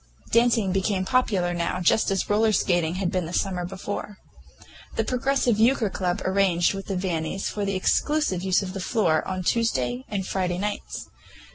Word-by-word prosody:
Dancing 230 -4 +3
became 190 0 0
popular 190 -7 +1
now, 175 +1 -1
just 185 +5 +3
as 195 -1 0
roller 215 +1 +3
skating 175 -4 +1
had 185 -1 -1
been 185 -4 -1
the 170 - -7
summer 180 -3 -1
before. 200 +2 -6 0.8
The - - +1
Progressive 255 -3 +1
Euchre 225 -3 +3
Club 180 +1 -2
arranged 190 -2 +2
with 195 0 -6
the 195 - -2
Vannis 180 0 -2
for 205 -1 -3
the 195 -1 -1
exclusive 245 - +1
use 190 +1 +2
of 185 -1 -6
the 195 - -5
floor 180 -5 +1
on 185 -1 -3
Tuesday 130 - 0
and 195 -3 -2
Friday 180 -2 -1
nights. 205 +2 -4
190 Hz, 170 wpm, -25 LUFS, 180-210 Hz, 0.8 s, Dancing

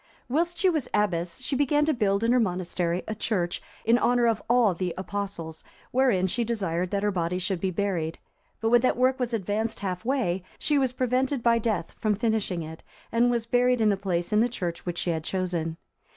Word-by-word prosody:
Whilst 335 +7 0
she 375 - +3
was 315 -7 +1
abbess, 175 -5 0
she 275 - -2
began 290 +2 +2
to 310 - +2
build 205 -4 +1
in 230 - +3
her 250 - +4
monastery 180 -3 -1
a 215 - -2
church, 190 -5 -1 0.2
in 230 +2 +4
honour 245 0 +3
of 225 -2 +2
all 240 -5 +4
the 180 0 -3
Apostles, 185 -4 -5 0.3
wherein 245 -8 +3
she 235 +6 0
desired 185 -6 -1
that 200 +1 -1
her 210 - +2
body 175 -1 -1
should 185 -1 -2
be 190 - +1
buried; 175 -4 -1 0.4
but 225 - +1
when 240 0 +5
that 255 - +2
work 255 +1 +2
was 245 -2 -1
advanced 220 +1 -2
half 185 -2 -3
way, 230 -8 0 0.2
she 295 -2 +1
was 260 -2 +1
prevented 255 +1 0
by 235 -1 +4
death 210 -7 -1
from 215 -1 +1
finishing 215 -6 -1
it, 160 +1 -9 0.3
and 235 +1 +3
was 235 -2 0
buried 245 +1 +3
in 220 -1 +4
the 200 - +3
place 185 -1 -2
in 210 - +5
the 240 - +2
church 175 -7 -4
which 175 -1 -2
she 175 - 0
had 160 -1 -2
chosen. 170 -3 -2
210 Hz, 210 wpm, -26 LUFS, 180-245 Hz, 0.4 s, when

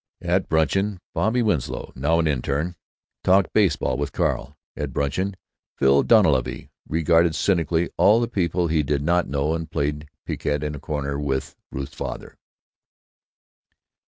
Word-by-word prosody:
At 90 +1 0
bruncheon 95 +6 +1 0.2
Bobby 120 +3 +1
Winslow, 85 - -2
now 75 +6 +1
an 85 - +2
interne, 75 +4 -1 0.5
talked 95 -1 +3
baseball 80 -11 +2
with 70 0 -2
Carl. 70 +4 -1 0.2
At 75 -4 -4
bruncheon 95 +8 -1 0.4
Phil 70 +1 +4
Dunleavy 80 - +2 0.2
regarded 80 0 +3
cynically 85 -1 +1
all 105 +3 +5
the 120 - 0
people 90 -5 0
he 80 -1 +2
did 70 0 -1
not 85 +2 +2
know 70 +3 0
and 80 -1 -4
played 75 0 -2 0.2
piquet 75 0 -2
in 75 - -3
a 75 - -7
corner 70 -1 -3
with 70 -1 -2 0.2
Ruth's 70 +1 -5
father. - - -6
80 Hz, 140 wpm, -23 LUFS, 70-90 Hz, 0.5 s, all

